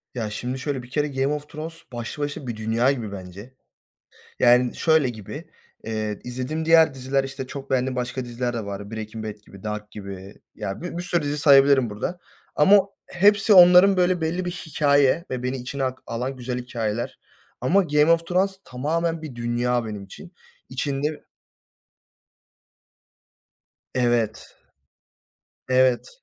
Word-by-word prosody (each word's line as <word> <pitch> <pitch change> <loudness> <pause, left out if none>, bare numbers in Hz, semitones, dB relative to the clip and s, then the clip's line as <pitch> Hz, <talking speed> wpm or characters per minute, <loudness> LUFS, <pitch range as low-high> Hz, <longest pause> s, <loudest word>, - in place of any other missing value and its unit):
Ya, 115 -3 -2
şimdi 125 +5 -4
şöyle, 135 -2 -3
bir 120 - -13
kere 150 +2 0
Game 135 +1 0
of 150 0 -6
Thrones 155 +2 -6 0.2
başlı 120 +5 -5
başına 145 -2 -5
bir 120 - -3
dünya 115 +4 +1
gibi 115 -7 -4
bence. 100 +5 -9 0.9
Yani, 125 0 +4
şöyle 160 -5 +3
gibi, 110 -5 -8 0.3
eee, 110 -2 -3
izlediğim 130 +6 -4
diğer 160 -2 +6
diziler, 135 +1 -1
işte, 135 -1 -6
çok 140 0 -8
beğendiğim 130 0 +1
başka 125 +1 -3
diziler 120 0 -3
de 115 -3 -4
var. 100 +1 -6
Breaking 110 0 -6
Bad 105 -1 -5
gibi, 100 -1 -14
Dark 105 0 -5
gibi, 100 -2 -9 0.2
ya, 95 - -5
bi 175 0 -5
bir 175 - -3
sürü 175 -1 0
dizi 145 +1 -2
sayabilirim 140 -4 +5
burada, 105 +13 -4 0.4
ama 195 +7 +7 0.3
hepsi, 205 +3 +4
onların 180 +1 +8
böyle 180 -1 +2
belli 170 +3 -1
bir 175 - -2
hikâye 145 -2 +2
ve 125 -1 -3
beni 130 +1 -2
içine 130 +2 -4
ak 130 0 -2
alan 125 +3 -3
güzel 125 0 -4
hikâyeler 120 -2 -4 0.4
ama, 185 +11 +3
Game 150 -1 +3
of 165 0 +2
Thrones 190 +2 0
tamamen 165 +6 -2
bir 150 -6 -8
dünya 120 0 0
benim 105 -2 -6
için. 170 - -12 0.4
İçinde 140 +3 -3 2.7
Evet 120 -3 0 1.1
Evet, 130 -1 +3
130 Hz, 150 wpm, -24 LUFS, 120-155 Hz, 2.7 s, onların